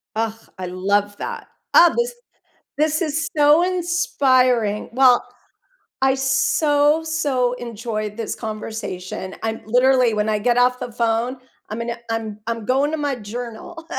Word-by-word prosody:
Ugh, 225 Hz, 0 st, 0 dB, 0.2 s
I 185 Hz, -, -5 dB
love 200 Hz, +3 st, 0 dB
that. -, -, -6 dB, 0.3 s
Oh, 345 Hz, -1 st, +7 dB
this 480 Hz, +1 st, 0 dB, 0.6 s
this 310 Hz, +1 st, +1 dB
is 315 Hz, 0 st, -1 dB
so 295 Hz, +2 st, +5 dB
inspiring. 255 Hz, -, +1 dB
Well, 250 Hz, 0 st, +5 dB, 0.8 s
I 265 Hz, 0 st, +3 dB
so, 290 Hz, +3 st, +2 dB
so 280 Hz, -6 st, 0 dB
enjoyed 220 Hz, -3 st, -4 dB
this 225 Hz, -1 st, -4 dB
conversation. 215 Hz, -4 st, -6 dB
I'm 225 Hz, 0 st, -2 dB
literally, 250 Hz, +1 st, +3 dB
when 210 Hz, 0 st, 0 dB
I 215 Hz, -1 st, +1 dB
get 240 Hz, +3 st, +1 dB
off 250 Hz, 0 st, +3 dB
the 245 Hz, -, -5 dB
phone, 235 Hz, +2 st, 0 dB, 0.3 s
I'm 215 Hz, +2 st, -5 dB
gonna 235 Hz, 0 st, -3 dB
I'm 220 Hz, -2 st, -3 dB
I'm 230 Hz, -2 st, -3 dB
going 270 Hz, +5 st, +1 dB
to 315 Hz, -, -2 dB
my 290 Hz, -2 st, -1 dB
journal. 245 Hz, -, -8 dB
245 Hz, 140 wpm, -21 LUFS, 220-285 Hz, 0.8 s, Oh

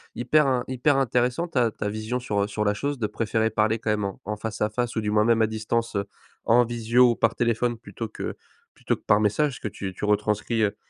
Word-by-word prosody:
hyper 150 Hz, +4 st, +3 dB
in 125 Hz, -2 st, +1 dB
hyper 130 Hz, +3 st, +2 dB
intéressant 125 Hz, +4 st, +1 dB
ta 125 Hz, -7 st, +2 dB
ta 105 Hz, -1 st, -4 dB
vision 110 Hz, +4 st, -3 dB
sur, 105 Hz, -5 st, 0 dB
heu, -, -, -2 dB
sur 105 Hz, +1 st, -2 dB
la 105 Hz, 0 st, +2 dB
chose 140 Hz, +7 st, -3 dB
de 110 Hz, -4 st, -1 dB
préférer 110 Hz, +1 st, 0 dB
parler 110 Hz, +1 st, +1 dB
quand 110 Hz, -, -3 dB
même 105 Hz, -1 st, 0 dB
en 100 Hz, -, -6 dB
en 105 Hz, +1 st, -4 dB
face-à-face, 110 Hz, +2 st, -2 dB
ou 110 Hz, -, 0 dB
du 105 Hz, -1 st, -1 dB
moins 105 Hz, 0 st, +3 dB
même 115 Hz, -1 st, +3 dB
à 110 Hz, -, +4 dB
distance, 110 Hz, +1 st, -2 dB
heu, 100 Hz, -, -1 dB, 0.4 s
en 120 Hz, +2 st, +5 dB
visio, 120 Hz, +1 st, +3 dB
par 115 Hz, 0 st, +1 dB
téléphone, 120 Hz, 0 st, 0 dB
plutôt 110 Hz, +1 st, -7 dB
que 110 Hz, -, -6 dB, 0.4 s
plutôt -, -, -1 dB
que -, -, -19 dB
par 105 Hz, -, +3 dB
message, 120 Hz, +6 st, +1 dB
que -, -, -4 dB
tu 95 Hz, -2 st, -6 dB
tu 95 Hz, -, -4 dB
retranscris, 105 Hz, +2 st, 0 dB
heu, 105 Hz, 0 st, 0 dB
110 Hz, 230 wpm, -25 LUFS, 105-120 Hz, 0.4 s, en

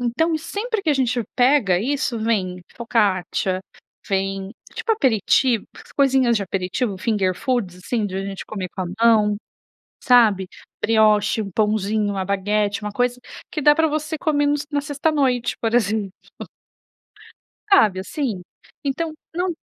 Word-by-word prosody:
Então 315 Hz, +8 st, 0 dB
e -, -, 0 dB
sempre 410 Hz, +5 st, -3 dB
que 315 Hz, -, +1 dB
a -, -, +4 dB
gente 250 Hz, -3 st, 0 dB
pega 245 Hz, -8 st, +4 dB
isso 250 Hz, 0 st, -1 dB
vem 190 Hz, -5 st, -1 dB, 0.2 s
focaccia, 195 Hz, -5 st, 0 dB, 0.5 s
vem, 195 Hz, 0 st, -1 dB, 0.2 s
tipo 455 Hz, -, -3 dB
aperitivo, 245 Hz, -, +2 dB, 0.3 s
coisinhas 265 Hz, -4 st, +3 dB
de 205 Hz, -, -1 dB
aperitivo, 190 Hz, +3 st, -2 dB
finger 200 Hz, -4 st, +1 dB
food, 200 Hz, -4 st, -2 dB
assim, 210 Hz, +3 st, -2 dB
da 190 Hz, +1 st, -4 dB
gente 195 Hz, -2 st, -6 dB
comer 190 Hz, -4 st, -5 dB
com 185 Hz, -, -1 dB
a -, -, -3 dB
mão, 215 Hz, -3 st, +4 dB, 0.7 s
sabe? 220 Hz, -6 st, +5 dB, 0.4 s
Brioche, 215 Hz, -1 st, +3 dB
um 200 Hz, -, -5 dB
pãozinho, 210 Hz, 0 st, 0 dB
uma 190 Hz, -1 st, -2 dB
baguete, 205 Hz, +2 st, 0 dB
uma 210 Hz, 0 st, -4 dB
coisa 245 Hz, +2 st, 0 dB, 0.3 s
que 305 Hz, -, -4 dB
dá 295 Hz, +1 st, +6 dB
pra 320 Hz, +1 st, +2 dB
você 305 Hz, +1 st, -2 dB
comer 290 Hz, -2 st, +1 dB
no 290 Hz, -, +2 dB
na 290 Hz, -1 st, 0 dB
sexta 290 Hz, +1 st, -2 dB
à -, -, +4 dB
noite, 255 Hz, -5 st, +1 dB
por 225 Hz, 0 st, -1 dB
exemplo. 210 Hz, -4 st, +1 dB, 1.6 s
Sabe 210 Hz, -, +5 dB
assim? 220 Hz, -1 st, -3 dB, 0.4 s
Então 310 Hz, +4 st, -2 dB, 0.2 s
não 360 Hz, +2 st, 0 dB
225 Hz, 150 wpm, -21 LUFS, 200-275 Hz, 1.6 s, dá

